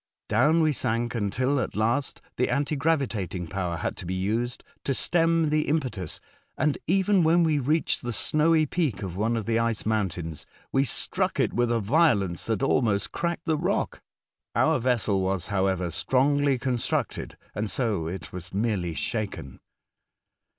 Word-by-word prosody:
Down 150 +10 +4
we 155 -1 +3
sank 120 -2 -1
until 125 +6 0
at - - -3
last 115 +6 0
the 125 - +1
anti 145 +2 0
gravitat 135 - 0
ing 90 -1 -3
power 85 0 -3
had - - -3
to - - -7
be 95 - -2
used 115 +6 -2 0.2
to 135 - 0
stem 165 -1 +2
the 155 0 +1
impetus, 130 - -2 0.4
and 150 -2 +2
even 190 +1 +3
when 170 +2 +4
we 155 -3 +2
reached 150 +5 +1
the 120 - -3
snowy 155 +6 +3
peak 145 - -1
of 90 -3 -5
one 110 +4 0
of 110 - -3
the 115 0 +1
ice 115 -2 -1
mountains, 90 -8 -2 0.2
we 135 +1 +3
struck 115 - 0
it - - +2
with 120 0 +1
a 115 - +2
violence 105 - +2
that 115 +4 0
almost 110 -7 +1
cracked 170 -1 -2
the 155 -2 +1
rock. - - -1 0.5
Our 160 -3 +3
vessel 115 -5 +1
was, 95 -2 -1
however, 95 -2 +1
strongly 140 - +2
constructed, 125 -1 -2 0.2
and 105 0 -2
so 100 -7 -1
it 90 +2 -6
was 90 0 -7
merely 95 -5 -1
shaken. 105 - -4
120 Hz, 165 wpm, -26 LUFS, 100-150 Hz, 0.5 s, Down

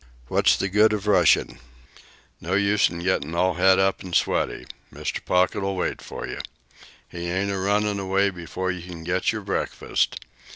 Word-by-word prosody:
"What's - - +3
the 95 - -1
good 105 +3 +4
of 105 -1 -3
rushin'? 95 -9 +3 0.8
No 90 +3 -2
use 100 +1 +3
in 85 0 -7
gettin' 85 -3 -1
all 90 +2 +2
het 95 +2 +4
up 95 0 +1
an' 90 -2 -8
sweaty. - - 0 0.3
Mr. - - -4
Pocket'll 95 +2 +1
wait 90 - -2
for - - -7
you. - - -6 0.7
He 85 0 -6
ain't 95 +3 -1
a 100 - -2
runnin' 100 +1 +1
away 100 +1 +1
before 90 +1 -4
you 90 -1 -6
can 85 -1 -9
get 90 +2 0
your 110 -2 -5
breakfast. 95 - -1
95 Hz, 170 wpm, -24 LUFS, 90-100 Hz, 0.8 s, good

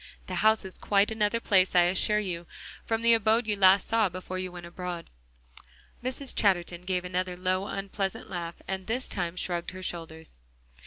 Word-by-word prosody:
The 185 - -6
house 220 -1 +4
is 190 - -8
quite 200 +1 +2
another 220 +1 +1
place, 190 -5 +3
I 175 - +7
assure 190 +4 +3
you, 175 -5 -3 0.4
from 225 0 -1
the 235 0 +6
abode 225 +1 +3
you 215 - 0
saw 190 -1 +7 0.2
last 200 -4 +2
before 185 +1 -5
you 185 -1 -4
went 175 -1 -9
abroad." 175 0 -6 0.9
Mrs. 260 +2 -2
Chatterton 175 -4 +2
gave 180 -1 -1
another 180 0 -2
low, 185 +2 0
unpleasant 195 0 -3
laugh, 170 -2 -5
and 190 -1 -4
this 245 +4 -1
time 175 -3 -2
shrugged 175 -1 -2
her 185 0 -9
shoulders. 160 - -6
185 Hz, 175 wpm, -28 LUFS, 180-210 Hz, 0.9 s, I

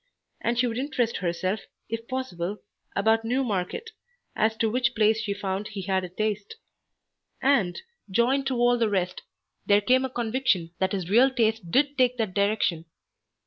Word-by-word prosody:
And 235 0 0
she 250 - +3
would 235 0 -2
interest 255 -4 -1
herself, 185 +3 -1 0.3
if 230 +1 -5
possible, 210 -8 -3 0.4
about 220 +3 +3
Newmarket, 245 - -2 0.4
as 220 +1 +1
to 225 - +2
which 250 +2 0
place 220 0 +3
she 210 -2 -3
found 200 0 -3
he 200 -3 -6
had 190 0 0
a 180 - -5
taste. 210 - -3 0.8
And, 230 -11 +2 0.3
joined 255 +7 +2
to 265 - 0
all 240 0 +3
the 225 -2 +2
rest, 185 -2 -1 0.5
there 205 0 +6
came 255 +5 +3
a 265 - -1
conviction 235 -8 0
that 190 +1 +1
his 185 -4 -2
real 240 +8 +5
tastes 225 -4 +1
did 275 +11 +1
take 250 -1 +3
that 220 -5 -1
direction. 200 -5 +1
220 Hz, 165 wpm, -26 LUFS, 195-250 Hz, 0.8 s, there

